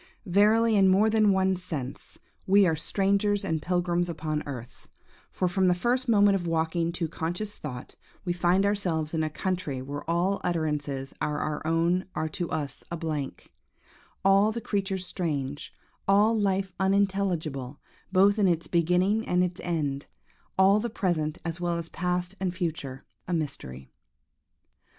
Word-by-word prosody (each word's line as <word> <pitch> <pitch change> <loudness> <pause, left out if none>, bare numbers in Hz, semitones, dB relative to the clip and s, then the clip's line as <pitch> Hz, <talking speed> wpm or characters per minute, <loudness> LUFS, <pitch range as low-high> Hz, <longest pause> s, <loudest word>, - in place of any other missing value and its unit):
Verily, 215 +4 +4
in 195 -2 +5
more 200 +4 +4
than 215 -2 +4
one 190 0 +2
sense, 155 -8 -6 0.3
we 200 +1 +6
are 165 -3 +2
"strangers 200 +4 +1
and 160 -4 -1
pilgrims 175 0 0
upon 155 -2 -2
earth;" 125 -4 -8 0.4
for, 185 - 0
from 185 +1 +2
the 180 - +4
first 245 +7 0
moment 205 -2 +5
of 180 -3 -1
waking 165 +1 0
to 170 -1 -2
conscious 175 +6 -4
thought, 125 -4 -7 0.3
we 175 - 0
find 175 +3 +2
ourselves 175 -7 0
in 160 - 0
a 155 - 0
country 175 -4 -3
where 140 +3 -5
all 180 +4 +1
utterances 150 -5 -2
but 155 - 0
our 150 0 -2
own 170 +3 +2
are 160 - -1
to 170 +2 -4
us 145 -3 -4
a 170 - -4
blank; 155 -4 -4 0.7
all 195 +2 +5
the 235 - -4
creatures 195 -4 -2
strange; 145 -6 -3 0.4
all 205 +3 +4
life 195 -2 0
unintelligible, 190 -9 0 0.3
both 200 +2 +4
in 200 - +4
its 170 -2 +1
beginning 180 +6 +2
and 180 0 +3
its 180 -1 -3
end: 145 -5 -2 0.5
all 195 +2 +5
the 235 +2 -2
present, 170 -8 -1
as 165 +1 -3
well 175 -1 0
as 170 - -4
the - - -17
past 180 0 -2
and 185 -2 -2
future, 150 -7 -4 0.2
a 180 - -2
mystery. 65 - -4
175 Hz, 160 wpm, -27 LUFS, 155-195 Hz, 0.7 s, we